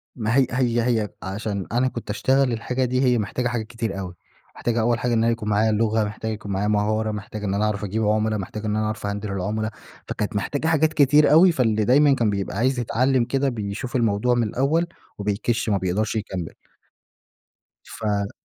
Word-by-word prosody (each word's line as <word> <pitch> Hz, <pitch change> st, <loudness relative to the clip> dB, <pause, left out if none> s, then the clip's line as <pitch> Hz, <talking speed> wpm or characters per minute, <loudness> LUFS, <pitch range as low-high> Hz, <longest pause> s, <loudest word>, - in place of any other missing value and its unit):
ما 110 Hz, 0 st, -1 dB
هي 135 Hz, -, +4 dB
هي 120 Hz, -2 st, +1 dB
هي 115 Hz, -4 st, +1 dB
عشان 100 Hz, 0 st, -3 dB
أنا 125 Hz, +2 st, +2 dB
كنت 120 Hz, -4 st, -6 dB
أشتغل 130 Hz, +4 st, +2 dB
الحاجة 125 Hz, +3 st, -1 dB
دي، 130 Hz, +1 st, 0 dB
هي 125 Hz, -2 st, +3 dB
محتاجة 125 Hz, +4 st, -1 dB
حاجات 115 Hz, -3 st, -3 dB
كتير 115 Hz, -4 st, -4 dB
أوي. 90 Hz, -2 st, -6 dB, 0.4 s
محتاجة 120 Hz, -1 st, -1 dB
أول 120 Hz, +1 st, +1 dB
حاجة 125 Hz, -1 st, 0 dB
إن 115 Hz, 0 st, +2 dB
أنا 115 Hz, -, +3 dB
يكون 110 Hz, -2 st, -3 dB
معايا 110 Hz, +2 st, +2 dB
لغة، 110 Hz, 0 st, +1 dB
محتاج 110 Hz, +1 st, -4 dB
يكون 105 Hz, -2 st, -6 dB
معايا 100 Hz, +2 st, 0 dB
مهارة، 110 Hz, +1 st, +1 dB
محتاج 105 Hz, 0 st, -6 dB
إن 100 Hz, -1 st, -1 dB
أنا 105 Hz, +2 st, +1 dB
أعرف 105 Hz, -1 st, -2 dB
أجيب 110 Hz, +3 st, -1 dB
عُمَلا، 110 Hz, 0 st, +1 dB
محتاج 105 Hz, +3 st, -6 dB
إن 105 Hz, 0 st, 0 dB
أنا 110 Hz, 0 st, 0 dB
أعرف 110 Hz, -1 st, -4 dB
أهندِل 100 Hz, 0 st, -4 dB
العُمَلا. 105 Hz, +3 st, -2 dB, 0.4 s
فكانت 105 Hz, +1 st, -3 dB
محتاجة 145 Hz, +9 st, -1 dB
حاجات 160 Hz, -1 st, +2 dB
كتير 145 Hz, +1 st, +5 dB
أوي، 175 Hz, +4 st, +7 dB
فاللي 110 Hz, -7 st, +1 dB
دايمًا 140 Hz, +3 st, +5 dB
كان 115 Hz, -4 st, +1 dB
بيبقى 100 Hz, -2 st, -3 dB
عايز 130 Hz, +2 st, +1 dB
يتعلّم 125 Hz, +1 st, +1 dB
كده، 135 Hz, +1 st, 0 dB
بيشوف 110 Hz, +3 st, -5 dB
الموضوع 115 Hz, +1 st, +2 dB
من 115 Hz, -2 st, +1 dB
الأول 150 Hz, +9 st, +1 dB, 0.3 s
وبيكِش 105 Hz, +3 st, -1 dB
ما 100 Hz, -, +2 dB
بيقدرش 95 Hz, +5 st, -1 dB
يكمّل. 95 Hz, -6 st, -4 dB, 1.3 s
ف 105 Hz, -2 st, -2 dB
110 Hz, 195 wpm, -23 LUFS, 105-125 Hz, 1.3 s, أوي